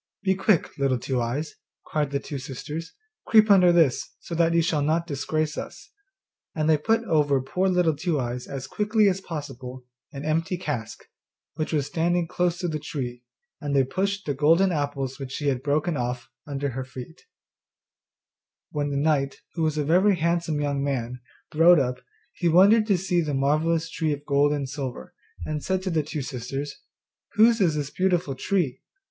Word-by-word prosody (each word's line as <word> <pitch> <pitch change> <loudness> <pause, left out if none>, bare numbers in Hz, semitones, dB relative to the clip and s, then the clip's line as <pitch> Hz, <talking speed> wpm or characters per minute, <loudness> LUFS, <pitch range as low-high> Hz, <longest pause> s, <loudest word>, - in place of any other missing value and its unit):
'Be 190 -1 +3
quick, 195 -1 +1
Little 135 -2 +2
Two 125 +1 -2
eyes,' 140 +7 -3 0.3
cried 150 -2 -1
the 140 0 -1
two 140 -1 -6
sisters, 150 +5 -6 0.3
'creep 215 -1 +6
under 180 -3 +7
this, 165 -7 +2
so - - -8
that 165 0 +2
you 170 - +4
shall 160 -3 +1
not 160 +3 +1
disgrace 155 0 -2
us,' - - -9 0.6
and 155 -1 0
they 160 - +5
put 225 +10 +1
over 145 -8 +2
poor 180 +9 -1
Little 180 -4 +2
Two 160 0 -1
eyes 125 0 -4
as 135 -1 -5
quickly 210 +7 +2
as 190 0 +1
possible 130 -7 -7 0.3
an 140 -1 -7
empty 165 +4 0
cask, 120 -10 -5 0.5
which 155 0 -3
was 150 -4 +1
standing 170 +3 0
close 175 0 0
to 175 - -2
the 155 -2 -2
tree, 125 -5 -5 0.4
and 145 -1 -2
they 135 - +5
pushed 195 +8 -2
the 145 - -1
golden 165 +7 +4
apples 140 -4 -2
which 135 -1 -6
she 145 0 -1
had 130 -2 -1
broken 150 +4 0
off 125 -1 -3 0.2
under 140 -2 -3
with 130 0 -5
her. 125 -2 -5 1.7
When 145 -1 -1
the 140 - -2
knight, 140 -2 0
who 165 - -4
was 155 -1 +1
a 150 - +1
very 185 +7 +4
handsome 170 -2 0
young 140 -1 -1
man, 125 -3 -3 0.3
rode 170 +3 +7
up, 125 -1 -1 0.3
he 175 - 0
wondered 200 +6 +6
to 200 -4 +3
see 175 -1 0
the 150 -3 -2
marvellous 155 +4 +1
tree 155 -2 -1
of 145 0 -7
gold 145 0 +3
and 145 -2 -1
silver, 130 - -6 0.3
and 150 -1 -3
said 190 0 -1
to 185 - -2
the 160 -2 +2
two 150 -1 -5
sisters, 135 +2 -5 0.6
'Whose 225 +1 +5
is 165 -5 +3
this 150 -1 -3
beautiful 180 -5 0
tree? 155 -1 -1
150 Hz, 185 wpm, -25 LUFS, 140-175 Hz, 1.7 s, under